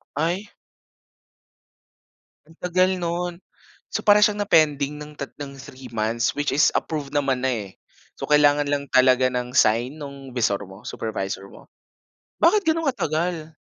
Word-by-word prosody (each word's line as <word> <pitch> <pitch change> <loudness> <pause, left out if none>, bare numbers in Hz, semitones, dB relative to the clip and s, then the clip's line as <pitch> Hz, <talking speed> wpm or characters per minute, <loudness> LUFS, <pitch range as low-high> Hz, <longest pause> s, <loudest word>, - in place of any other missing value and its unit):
Ay. 175 +7 -2 1.9
Ang 160 +2 -21
tagal 185 +1 +2
no'n. 175 0 -3 0.5
So - - -4
para 205 0 +6
siyang 210 -1 +3
na-pending 150 -6 +2
ng 150 0 -9
tat 140 - -6 0.3
3 130 -1 -11
months, 115 +4 0
which 145 -1 -1
is 145 +2 +3
approved 145 -2 -3
naman 135 -3 +1
na 130 - +2
eh. 105 -5 -4 0.5
So, - - -4
kailangan 145 -1 +4
lang 145 -1 -1
talaga 130 0 +5
ng 125 +1 -3
sign 120 +7 +3
nung 140 -2 -9
'visor 105 -4 +1
mo, 95 +2 -14
supervisor 100 -3 -4
mo? - - -15 0.7
Bakit 425 -1 +4
gano'n 325 -1 0
katagal? 160 - -2
145 Hz, 140 wpm, -23 LUFS, 130-170 Hz, 1.9 s, para